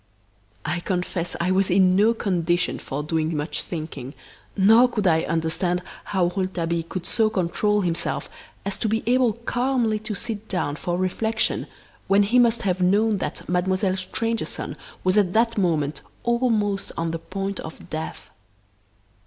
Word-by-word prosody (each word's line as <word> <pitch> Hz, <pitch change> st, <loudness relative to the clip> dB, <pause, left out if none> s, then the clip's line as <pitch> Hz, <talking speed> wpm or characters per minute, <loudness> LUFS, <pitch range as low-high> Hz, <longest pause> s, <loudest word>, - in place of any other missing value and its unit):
I 175 Hz, +3 st, -1 dB
confess 180 Hz, -1 st, -2 dB
I 180 Hz, +2 st, +1 dB
was 190 Hz, +1 st, +3 dB
in 185 Hz, 0 st, +5 dB
no 215 Hz, +4 st, +4 dB
condition 180 Hz, -4 st, 0 dB
for 145 Hz, +2 st, -4 dB
doing 160 Hz, 0 st, -1 dB
much 150 Hz, +2 st, -2 dB
thinking, 155 Hz, -5 st, -6 dB, 0.4 s
nor 225 Hz, +6 st, +6 dB
could 210 Hz, -4 st, -2 dB
I 160 Hz, -3 st, +4 dB
understand 165 Hz, +2 st, 0 dB, 0.2 s
how 180 Hz, -3 st, +1 dB
Rouletabille 170 Hz, -3 st, -1 dB
could 185 Hz, -, -4 dB
so 220 Hz, -2 st, +2 dB
control 210 Hz, +2 st, +1 dB
himself 170 Hz, -2 st, -1 dB, 0.4 s
as 200 Hz, 0 st, -3 dB
to 220 Hz, -, 0 dB
be 225 Hz, +1 st, 0 dB
able 245 Hz, -1 st, +3 dB
calmly 240 Hz, -1 st, 0 dB
to 215 Hz, 0 st, -5 dB
sit 215 Hz, +2 st, -3 dB
down 145 Hz, -6 st, -1 dB
for 175 Hz, +3 st, -2 dB
reflection 215 Hz, +4 st, 0 dB, 0.4 s
when 200 Hz, +1 st, +5 dB
he 235 Hz, +5 st, +3 dB
must 235 Hz, -1 st, +3 dB
have 185 Hz, -2 st, 0 dB
known 205 Hz, +3 st, +3 dB
that -, -, -4 dB
Mademoiselle 185 Hz, +2 st, +1 dB
Stangerson 225 Hz, +5 st, -3 dB, 0.3 s
was 185 Hz, +3 st, +4 dB
at 185 Hz, -3 st, +1 dB
that 230 Hz, +1 st, +3 dB
moment 160 Hz, -7 st, 0 dB, 0.2 s
almost 225 Hz, -5 st, +1 dB
on 165 Hz, 0 st, -1 dB
the 165 Hz, -, -3 dB
point 195 Hz, +3 st, -4 dB
of 160 Hz, -, -9 dB
death. 155 Hz, 0 st, -5 dB
190 Hz, 155 wpm, -24 LUFS, 175-215 Hz, 0.4 s, nor